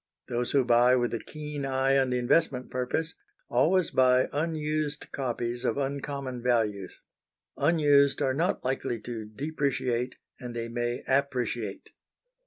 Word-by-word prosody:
Those 120 0 -1
who 135 -3 +3
buy 120 +1 +5
with 120 -1 0
a 115 - -1
keen 150 0 -6
eye 135 0 +1
on 130 -1 +1
the 125 - 0
investment 130 +1 +1
purpose, 130 +6 -2 0.4
always 165 +9 +3
buy 130 0 +4
unused 155 -1 -2
copies 120 -2 -3
of - - 0
uncommon 140 -2 -3
values. 110 -6 0 0.6
Unused 145 -4 +4
are 135 -2 +1
not 165 +3 0
likely 125 -2 -1
to 115 -2 -6
depreciate, 130 -1 -2 0.2
and 125 -3 -7
they 115 0 -3
may 120 +1 -2
appreciate. 125 -6 -1
130 Hz, 135 wpm, -28 LUFS, 120-145 Hz, 0.6 s, buy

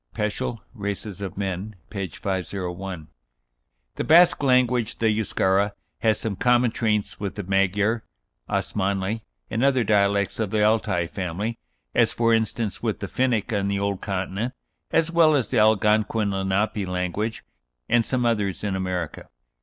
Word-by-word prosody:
(Peschel, 105 +2 -2
"Races 100 -2 -5
of 95 -2 -5
Men," 100 +2 -3 0.2
p. 100 -3 -3
501.) 90 -1 -4 0.9
The - - -1
Basque 170 +1 +6
language 125 -3 +2
the 110 -1 +2
Euscara 100 -1 +1 0.3
"has 110 -2 +2
some 110 -3 -3
common 120 +2 +3
traits 105 -3 -1
with 100 -2 -4
the 105 - -4
Magyar, 100 +4 +1 0.5
Osmanli, 100 +2 -1 0.3
and 115 +3 0
other 135 -3 +4
dialects 100 -1 +2
of 110 -3 0
the 105 +1 +1
Altai 105 -5 +2
family, 95 +5 -4 0.3
as, - - +3
for 115 -1 +2
instance, 110 -2 -1
with - - -1
the - - -3
Finnic 125 -4 0
on 100 -1 0
the 100 0 0
old 100 -1 -1
continent, 100 +5 -3 0.3
as 165 0 +2
well 165 -2 +5
as 130 -5 0
the 125 - +2
Algonquin 110 0 +3
Lenape 95 +1 0
language 90 +5 -2 0.4
and 120 - +3
some 125 +1 -1
others 105 -5 0
in 100 -2 -1
America." 90 -4 -3
105 Hz, 145 wpm, -24 LUFS, 95-115 Hz, 0.9 s, Basque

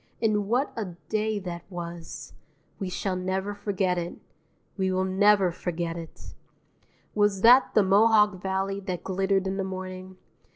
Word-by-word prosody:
And 210 -3 +1
what 250 +6 0
a 195 -6 -5
day 215 0 0
that 175 -3 -5
was! 170 -2 -7 0.5
We 190 - -3
shall 185 +1 -2
never 190 +2 -2
forget 195 -3 -1
it; 170 0 -5 0.6
we 190 -2 0
will 185 0 +1
never 195 0 +4
forget 170 -1 -3
it! 165 -1 -10 0.8
Was 205 -2 +2
that 245 +4 +6
the 215 - +6
Mohawk 210 0 +4
Valley 195 +1 -1
that 185 -3 -5
glittered 195 0 0
in 190 0 -2
the 195 - -1
morning? 185 0 -7
190 Hz, 150 wpm, -27 LUFS, 185-205 Hz, 0.8 s, that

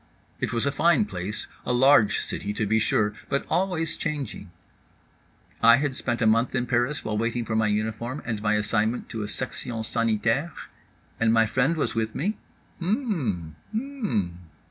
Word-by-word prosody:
It - - -1
was 115 +1 0
a 140 - +2
fine 170 +8 +3
place, 100 - -4 0.2
a - - -2
large 125 -4 +5
city 105 - -3
to 110 - -1
be 110 +2 +2
sure. 105 -1 +2 0.2
But 140 - 0
always 170 -2 0
changing. 150 - -4 1.1
I 115 0 +8
had 135 0 -1
spent 120 -1 -1
a - - +3
month 115 +4 +3
in 125 -1 +1
Paris 125 +4 0
while 105 -1 -1
waiting 115 +1 -1
for 110 - -2
my 110 0 +3
uniform 110 +6 -2
and 110 -3 -3
my 105 0 +2
assignment 110 +2 0
to 115 - -4
a 105 - -3
section 120 -1 -4
sanitaire? 115 +8 0 0.7
And 115 -1 +3
my 115 0 +5
friend 130 +8 +1
was - - 0
with 110 -1 -2
me? 200 +8 -1 0.4
H 170 - -3
mmm 160 - -1 0.2
mm. 220 - -1
115 Hz, 170 wpm, -26 LUFS, 110-145 Hz, 1.1 s, I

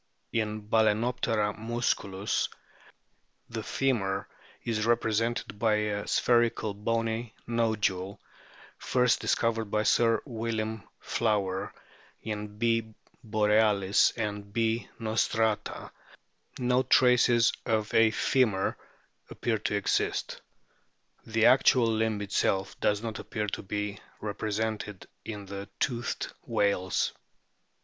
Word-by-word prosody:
In 110 -1 -1
Bal&noptera 110 0 +1
musculus 110 -4 -1 1.0
the 115 -1 -4
femur 105 -6 -1 0.4
is 110 -1 -1
represented 115 -2 0
by 110 -1 +3
a 105 -1 -1
spherical 120 -3 +2
bony 115 +2 -2
nodule, 105 -5 0 0.6
first 125 -1 +2
discovered 115 -1 +1
by 105 +1 0
Sir 115 +1 +3
William 110 -3 -3 0.2
Flower; 100 -4 -1 0.5
in 105 -1 -5
B. 115 -1 0 0.3
borealis 105 -2 +3
and 105 -2 -4
B. 115 +1 0
rostrata 110 -1 0 0.7
no 125 0 +2
traces 125 -3 +4
of 110 -2 0
a 115 0 +6
femur 110 -4 +1 0.5
appear 115 -2 -1
to 105 - -1
exist. 100 - -1 0.9
The 115 0 +2
actual 130 -1 +6
limb 110 -2 0
itself 95 -1 0
does 105 +1 +1
not 110 -1 -4
appear 105 -1 -3
to - - -4
be 105 0 -4 0.2
repre 105 0 -4
sented 105 -2 -3 0.2
in 105 -2 -6
the 100 +1 -7
toothed 120 -2 -2
whales. 95 -2 +1
110 Hz, 100 wpm, -29 LUFS, 105-115 Hz, 1.0 s, a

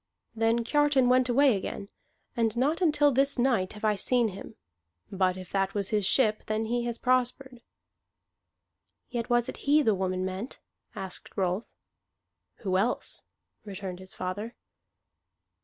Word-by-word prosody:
Then 225 +1 +2
Kiartan 290 -1 +3
went 255 0 +3
away 265 0 +4
again, 195 +1 -5 0.5
and 230 -1 0
not 295 +8 +1
until 295 -4 +4
this 275 +2 +2
night 240 -7 +1
have 210 +1 -6
I 210 -1 +3
seen 235 +3 +2
him. 200 +3 -10 0.6
But 185 -1 +1
if 185 -1 -10
that 195 0 0
was 200 -2 -1
his 210 -3 +2
ship, 215 -5 +3
then 215 +1 -1
he 240 +1 -1
has 235 -1 -2
prospered." 255 0 0 1.5
"Yet 235 -2 -2
it - - -24
was 240 -1 +3
he 295 +4 +2
the 220 - +3
woman 185 -1 -1
meant?" 190 +6 -5 0.4
asked 190 -2 -6
Rolf. 190 +3 0 1.0
"Who 185 -3 +1
else?" 225 +5 -1 0.4
returned 190 -3 -7
his 185 0 -11
father. 205 +6 -5
225 Hz, 145 wpm, -28 LUFS, 195-255 Hz, 1.5 s, away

